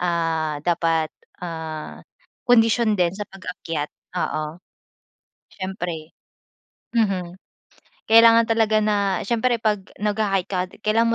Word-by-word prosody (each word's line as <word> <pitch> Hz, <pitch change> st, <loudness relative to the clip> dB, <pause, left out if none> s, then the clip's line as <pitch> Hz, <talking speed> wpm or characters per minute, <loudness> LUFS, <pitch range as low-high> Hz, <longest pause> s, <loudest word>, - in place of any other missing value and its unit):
ah, 165 Hz, -3 st, 0 dB
dapat 165 Hz, -2 st, +1 dB, 0.3 s
ah, 160 Hz, -2 st, -6 dB, 0.5 s
kondisyon 225 Hz, -2 st, +4 dB
din 175 Hz, -2 st, +2 dB
sa 205 Hz, +1 st, -6 dB
pag-akyat. 165 Hz, -5 st, -5 dB, 0.2 s
Oo. 155 Hz, -2 st, -2 dB, 0.9 s
Siyempre 180 Hz, -4 st, -5 dB, 0.8 s
mhm. 185 Hz, -5 st, 0 dB, 0.7 s
Kailangan 230 Hz, 0 st, +8 dB
talaga 220 Hz, -1 st, +2 dB
na 200 Hz, -2 st, +1 dB
siyempre 235 Hz, +3 st, +1 dB
'pag 210 Hz, -4 st, -1 dB, 0.2 s
nagha-hike 205 Hz, -3 st, 0 dB
ka, 185 Hz, -1 st, 0 dB, 0.2 s
kailangan 225 Hz, +2 st, +3 dB
190 Hz, 95 wpm, -23 LUFS, 165-220 Hz, 0.9 s, Kailangan